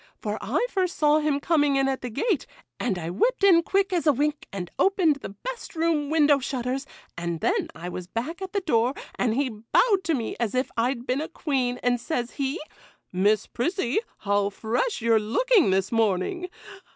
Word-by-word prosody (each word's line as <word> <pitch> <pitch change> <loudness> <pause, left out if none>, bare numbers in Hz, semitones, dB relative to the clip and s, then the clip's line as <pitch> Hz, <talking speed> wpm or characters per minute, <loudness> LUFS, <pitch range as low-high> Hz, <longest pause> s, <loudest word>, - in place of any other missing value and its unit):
for - - -3
I - - 0
first 370 -3 -1
saw 300 0 +4
him 300 -2 +1
coming 290 -2 +2
in 270 0 +2
at 270 -1 -1
the 250 - -4
gate, 305 - -1 0.3
and 210 -7 -1
I 170 -1 -4
whipped 470 - +1
in 360 -4 +7
quick 390 +2 +1
as 340 -3 0
a - - +8
wink 295 +2 -1
and 180 -3 -5
opened 365 -7 +3
the - - -7
best 465 - -7
room 320 -3 +1
window 300 -2 +4
shutters, 260 +1 -3 0.3
and 170 -1 -3
then - - 0
I 165 +2 -7
was 180 0 -6
back 250 - -4
at 380 -1 -5
the 400 - -1
door, 250 -6 +1 0.2
and 230 -3 0
he 275 0 +1
bowed 310 - +2
to 330 - +2
me 230 -4 -3
as 235 -1 -1
if 255 +1 0
I'd 240 +1 0
been 260 +3 0
a 315 - -3
queen, 255 -6 -1
and 245 -1 +1
says 245 -5 -2
he, 275 +3 -2 0.5
"Miss 205 +4 +2
Prissy, 300 - -1 0.2
how 200 0 +1
fresh 230 - -1
you're 230 -1 +4
looking 370 - +3
this 190 0 +1
morning!" 225 - 0
270 Hz, 195 wpm, -25 LUFS, 225-330 Hz, 0.5 s, a